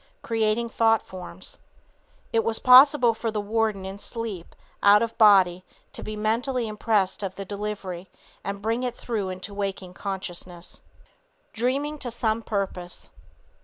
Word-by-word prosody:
(Creating 225 +1 0
thought 225 -1 +2
forms.) 185 0 -10 0.7
It 225 -1 +3
was 225 -1 +2
possible 255 -1 +7
for 225 +1 -3
the 215 -1 -2
warden 210 -2 -1
in 195 +1 -7
sleep, 215 -6 -6 0.3
out 205 +2 +6
of 230 - -2
his - - -32
body, 190 -4 +5 0.3
to - - -7
be 215 - -5
mentally 230 +3 -1
impressed 210 -3 0
of 190 -2 -4
the 195 - -6
delivery 195 -3 -5 0.3
and 200 0 -5
bring 225 +3 0
it 250 -1 -2
through 215 -5 -3
into 185 +2 -6
waking 195 -2 -4
consciousness. 180 -3 -6 0.7
DREAMING 275 +6 -1
TO 250 - -5
SOME 225 -1 -1
PURPOSE. 195 -5 -4
210 Hz, 145 wpm, -25 LUFS, 190-230 Hz, 0.7 s, possible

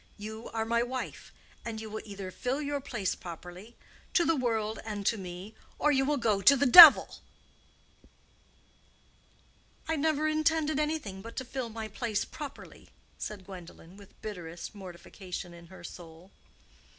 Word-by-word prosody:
You 220 +2 -8
are 225 -1 -2
my 235 +1 +1
wife. 255 +2 -5 0.3
And 225 -2 -5
you 220 - -7
will 215 0 -6
either 200 -3 -7
fill 250 +8 -3
your 290 -1 -3
place 215 -8 -2
properly—to 180 - -5
the 330 - +2
world 225 -4 -1
and 210 -2 -5
to 230 - +2
me—or 190 +9 -4
you 270 -1 +2
will 295 +1 +1
go 215 -6 +1
to 280 - +7
the 280 - +2
devil." 315 +3 +10 2.7
"I 320 - 0
never 310 0 +1
intended 310 -1 +1
anything 300 -11 -3
but 230 +3 -10
to 260 - -4
fill 255 -1 -5
my 220 0 -6
place 215 0 -2
properly," 290 -2 -10 0.3
said 200 -3 -6
Gwendolen, 180 -2 -12
with 200 -1 -17
bitterest 175 -5 -7
mortification 180 -2 -9
in 170 0 -14
her 185 0 -14
soul. 170 +1 -12
220 Hz, 145 wpm, -29 LUFS, 190-270 Hz, 2.7 s, devil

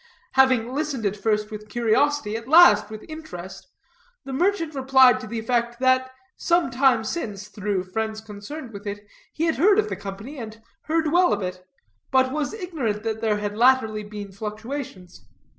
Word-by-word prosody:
Having 255 -2 +3
listened 280 -5 -2
at 200 0 0
first 210 0 -1
with 215 0 -8
curiosity, 240 +1 +1
at 230 +1 -6
last 235 -10 +7
with 215 0 -9
interest, 310 - -9 0.6
the 270 - -6
merchant 335 +1 0
replied 265 -2 +5
to 250 - -8
the 230 +2 -5
effect, 235 +1 -1
that 260 0 +3 0.3
some 340 -5 +1
time 250 -2 +3
since, 210 - -5
through 200 -3 -2
friends 220 +3 -3
concerned 220 +5 -9
with 205 +1 -9
it, 205 +1 -6 0.3
he 320 - -3
had 330 -1 +1
heard 395 +8 +5
of 430 0 +1
the - - -3
company, 200 +9 -8
and 220 -1 -8 0.3
heard 315 -1 0
well 355 +2 +4
of 205 -1 0
it, 180 0 -5 0.5
but 260 -1 +3
was 300 0 -2
ignorant 285 - -3
that 220 -1 -3
there 215 -2 +1
had 205 0 -4
latterly 230 -2 +3
been 205 -1 -8
fluctuations. 210 - -7
230 Hz, 175 wpm, -24 LUFS, 210-280 Hz, 0.6 s, last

